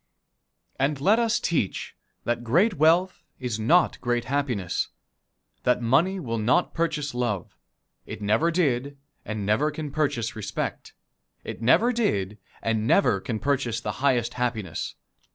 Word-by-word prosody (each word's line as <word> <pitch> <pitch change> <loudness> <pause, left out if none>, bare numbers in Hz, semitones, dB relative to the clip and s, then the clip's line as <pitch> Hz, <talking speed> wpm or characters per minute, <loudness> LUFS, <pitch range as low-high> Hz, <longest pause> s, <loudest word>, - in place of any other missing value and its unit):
And 135 +1 +1
let 205 +11 +4
us 235 0 +2
teach 150 - -1 0.3
that 120 0 -1
great 175 - +3
wealth 170 +4 +3 0.2
is 120 -4 -3
not 160 +10 +3
great 120 -1 0
happiness; 120 -9 -1 0.7
that 125 - +2
money 155 +11 +2
will 115 -8 -3
not 125 +11 +2
purchase 150 -4 -1
love; 120 -7 -2 0.5
it - - -6
never 110 +11 +2
did 140 -5 0 0.3
and 105 -1 -4
never 110 +9 +2
can 150 -1 -5
purchase 135 -7 -1
respect; 105 -2 -4 0.5
it - - -7
never 225 - +4
did 105 - -1 0.2
and 110 -1 0
never 120 -7 +4
can 115 +1 -3
purchase 125 -3 0
the - - -3
highest 125 -4 +2
happiness. 115 -8 -3
125 Hz, 135 wpm, -25 LUFS, 115-155 Hz, 0.7 s, let